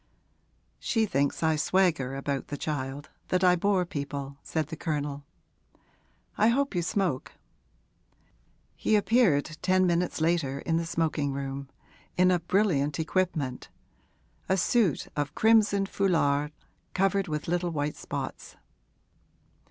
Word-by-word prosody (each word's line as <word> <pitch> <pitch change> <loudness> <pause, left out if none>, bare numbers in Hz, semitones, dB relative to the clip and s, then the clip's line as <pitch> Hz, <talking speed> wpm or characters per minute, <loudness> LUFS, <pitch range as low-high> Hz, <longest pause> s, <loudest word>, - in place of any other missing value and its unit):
'She 225 -1 +1
thinks 140 -4 0
I 160 0 +3
swagger 155 -5 +1
about 140 0 -3
the 145 - -5
child 140 -1 -4 0.2
that 185 0 +1
I 180 -1 +6
bore 185 0 +1
people,' 140 -3 -5
said 160 -2 -2
the - - -5
Colonel. 145 -3 -3 1.1
'I 215 - +5
hope 275 +3 +2
you 175 - 0
smoke.' 175 -6 -1 1.4
He 215 - +1
appeared 195 - +2
ten 185 0 +3
minutes 175 -1 0
later 160 -4 +1
in 165 -1 0
the 165 0 -2
smoking 155 -4 0
room, 135 0 -5 0.5
in 185 0 +5
a 180 - +3
brilliant 165 -5 +1
equipment, 160 -6 -1 0.8
a 190 - +3
suit 195 - +2
of 145 -1 -2
crimson 215 -3 +4
foulard 150 -7 +1 0.4
covered 195 +1 +2
with 150 -1 -3
little 175 +1 0
white 150 -2 -2
spots. - - -6
165 Hz, 125 wpm, -28 LUFS, 145-185 Hz, 1.4 s, I